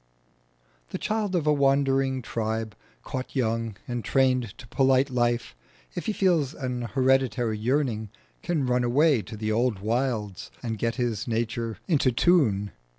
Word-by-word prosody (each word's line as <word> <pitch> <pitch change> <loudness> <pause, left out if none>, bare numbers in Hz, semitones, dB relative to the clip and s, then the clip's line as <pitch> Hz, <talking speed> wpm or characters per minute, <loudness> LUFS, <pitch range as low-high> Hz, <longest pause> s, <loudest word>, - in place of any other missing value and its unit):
The - - -4
child 210 -3 -1
of 165 -4 0
a 150 - +4
wandering 135 -2 +2
tribe 110 -2 -3 0.3
caught 130 - -5
young 115 -4 -1
and 120 -2 -3
trained 130 -3 +1
to 120 - -12
polite 135 0 +3
life, 120 - 0 0.4
if - - -5
he - - +2
feels 170 -9 +1
an 125 -3 -3
hereditary 130 -4 +2
yearning 120 -3 0 0.3
can 160 -6 -1
run 125 0 +1
away 135 +1 +3
to 105 +3 -9
the 110 0 -2
old 115 0 +1
wilds 110 - -2
and 115 -3 -3
get 115 0 0
his 120 -5 -2
nature 115 0 -2
into 145 -7 +3
tune. 115 - +3
125 Hz, 150 wpm, -26 LUFS, 115-135 Hz, 0.4 s, a